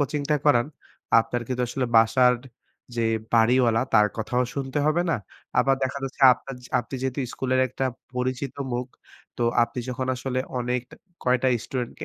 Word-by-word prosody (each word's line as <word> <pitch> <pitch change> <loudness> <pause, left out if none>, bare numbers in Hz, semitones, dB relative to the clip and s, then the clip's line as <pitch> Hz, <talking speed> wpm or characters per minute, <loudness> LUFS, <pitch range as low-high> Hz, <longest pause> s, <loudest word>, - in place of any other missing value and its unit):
কোচিংটা 145 +1 0
করান, 120 -4 +4 0.5
আপনার 120 +2 -3
কিন্তু 125 -1 -1
আসলে 125 +1 -1
বাসার 125 +3 +5 0.6
যে 115 - +1 0.3
বাড়িওয়ালা 115 0 +4
তার 105 -1 +6
কথাও 120 +3 0
শুনতে 135 0 -2
হবে 160 +3 +2
না। - - +2 0.4
আবার 135 0 +4
দেখা 130 +2 -1
যাচ্ছে 135 +1 -7
আপনা 135 - -7
যা 125 - -13
আপনি 120 - -9
যেহেতু 130 +1 -2
স্কুলের 130 0 0
একটা 130 +2 -3 0.3
পরিচিত 130 +1 -2 0.2
মুখ 120 +1 -2 0.5
তো 120 - -2 0.2
আপনি 115 +2 -3
যখন 130 +1 -3
আসলে 130 0 -3 0.2
অনেক 125 +1 -1 0.4
কয়েকটা 125 +1 +3 0.2
স্টুডেন্টকে 125 -3 -5
125 Hz, 155 wpm, -25 LUFS, 120-135 Hz, 0.6 s, তার